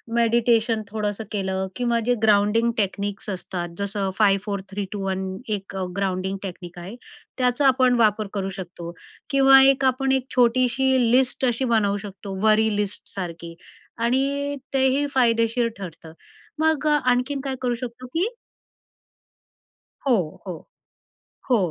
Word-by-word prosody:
Meditation 230 Hz, -1 st, +2 dB
थोडंसं 210 Hz, 0 st, -3 dB
केलं 190 Hz, -2 st, -2 dB
किंवा 240 Hz, -1 st, +1 dB
जे 245 Hz, -, +3 dB
ग्राउंडिंग 215 Hz, +2 st, +3 dB
टेक्निक्स 200 Hz, 0 st, -2 dB
असतात. 180 Hz, -2 st, -4 dB
जसं 200 Hz, -1 st, -2 dB
five 200 Hz, -2 st, +4 dB
four 200 Hz, -2 st, -3 dB
three 200 Hz, +1 st, -3 dB
to 200 Hz, -2 st, -4 dB
one, 190 Hz, 0 st, -2 dB, 0.2 s
एक 200 Hz, -2 st, -4 dB, 0.2 s
ग्राउंडिंग 190 Hz, 0 st, -1 dB
टेक्निक 175 Hz, -2 st, -8 dB
आहे. 185 Hz, +6 st, -8 dB, 0.4 s
त्याचा 250 Hz, +2 st, +2 dB
आपण 255 Hz, -1 st, +4 dB
वापर 215 Hz, -1 st, +3 dB
करू 195 Hz, -2 st, -2 dB
शकतो 175 Hz, -3 st, -7 dB, 0.4 s
किंवा 270 Hz, -1 st, +7 dB
एक 270 Hz, 0 st, +4 dB
आपण 265 Hz, +1 st, +1 dB
एक 265 Hz, -1 st, +1 dB
छोटीशी 255 Hz, +2 st, +3 dB, 0.2 s
लिस्ट 260 Hz, +1 st, +2 dB
अशी 245 Hz, +1 st, 0 dB
बनवू 215 Hz, -4 st, +2 dB
शकतो, 200 Hz, -1 st, -8 dB
वरी 220 Hz, 0 st, +4 dB
लिस्ट 205 Hz, -1 st, -4 dB
सारखी 170 Hz, -3 st, -6 dB, 0.5 s
आणि 280 Hz, +4 st, 0 dB, 0.2 s
तेही 265 Hz, +1 st, +2 dB
फायदेशीर 230 Hz, -1 st, +2 dB
ठरतं. 165 Hz, -4 st, -9 dB, 0.5 s
मग 315 Hz, -2 st, +2 dB
आणखीन 275 Hz, -1 st, +1 dB
काय 270 Hz, -1 st, -2 dB
करू 245 Hz, -1 st, 0 dB
शकतो 240 Hz, +1 st, -7 dB
की 330 Hz, -, 0 dB, 1.8 s
हो, 255 Hz, -, +5 dB, 0.3 s
हो. 175 Hz, -, -7 dB, 0.8 s
हो, 245 Hz, -, +5 dB
225 Hz, 135 wpm, -23 LUFS, 195-255 Hz, 1.8 s, किंवा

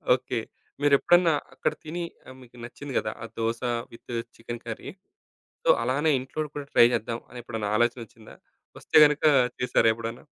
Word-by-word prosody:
Okay. 125 Hz, -1 st, -4 dB, 0.4 s
మీరేప్పుడన్నా 165 Hz, +4 st, +4 dB, 0.2 s
అక్కడ -, -, -1 dB
తిని, 170 Hz, +3 st, -4 dB, 0.2 s
ఆహ్, 130 Hz, -, -11 dB
మీకు 125 Hz, -1 st, -17 dB
నచ్చింది 135 Hz, +3 st, -8 dB
కదా! 110 Hz, 0 st, -3 dB
ఆ -, -, -4 dB
dosa 115 Hz, +1 st, -1 dB, 0.3 s
with 115 Hz, +1 st, -11 dB, 0.2 s
chicken 120 Hz, 0 st, -7 dB
curry. -, -, -6 dB, 0.7 s
So, -, -, 0 dB
అలానే 145 Hz, +6 st, +1 dB
ఇంట్లో 150 Hz, +4 st, -4 dB
కూడా 145 Hz, -, -5 dB
ట్రై -, -, +8 dB
చేద్దాం, 115 Hz, +1 st, -2 dB
అని 125 Hz, -, -9 dB
ఎప్పుడైనా 110 Hz, -3 st, -4 dB
ఆలోచనోచ్చిందా? 115 Hz, -2 st, -2 dB, 0.4 s
వస్తే -, -, -6 dB
గనక 150 Hz, +1 st, +1 dB, 0.4 s
చేసారా 125 Hz, -2 st, +3 dB
ఎప్పుడన్నా? 115 Hz, 0 st, -7 dB
120 Hz, 150 wpm, -26 LUFS, 115-145 Hz, 0.7 s, ట్రై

